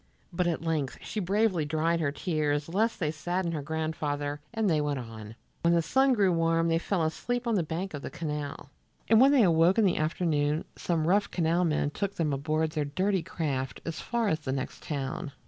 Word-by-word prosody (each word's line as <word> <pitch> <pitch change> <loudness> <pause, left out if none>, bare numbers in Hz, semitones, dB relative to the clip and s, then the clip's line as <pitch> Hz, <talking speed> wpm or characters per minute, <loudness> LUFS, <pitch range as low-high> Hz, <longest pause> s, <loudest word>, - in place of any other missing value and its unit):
But 175 +1 +1
at 165 -1 -1
length 155 -5 -1
she 215 - -4
bravely 200 -2 +1
dried 160 +3 0
her 150 -3 0
tears 150 -2 -1
lest 215 +8 0
they 155 -5 0
sadden 175 +3 -2
her 155 -3 -3
grandfather, 150 -1 -3
and 225 -2 0
they 160 -4 +2
went 145 -1 -1
on. 115 -3 -8 0.3
When 170 0 +3
the 170 - +2
sun 265 +8 +3
grew 200 -5 +3
warm 165 0 +2
they 165 0 +2
fell 175 -1 0
asleep 245 +10 -2
on 235 - +1
the 200 - +3
bank 170 +4 -4
of 145 - -5
the - - -5
canal, 150 -3 -5 0.4
and 225 +1 +6
when 270 +2 +7
they 270 -5 +5
awoke 170 +1 +4
in 220 - +5
the 185 - +2
afternoon 155 -1 0
some 165 -3 -1
rough 200 +3 +3
canal 170 +1 +1
men 150 -2 0
took 200 +4 -3
them 155 -4 0
aboard 155 +3 0
their 150 -2 -1
dirty 185 +6 0
craft 135 -6 -3
as 165 -1 -4
far 235 -1 -1
as 160 -5 +1
the 140 -4 -4
next 130 -1 -4
town. 140 +1 -4
165 Hz, 210 wpm, -28 LUFS, 150-185 Hz, 0.4 s, when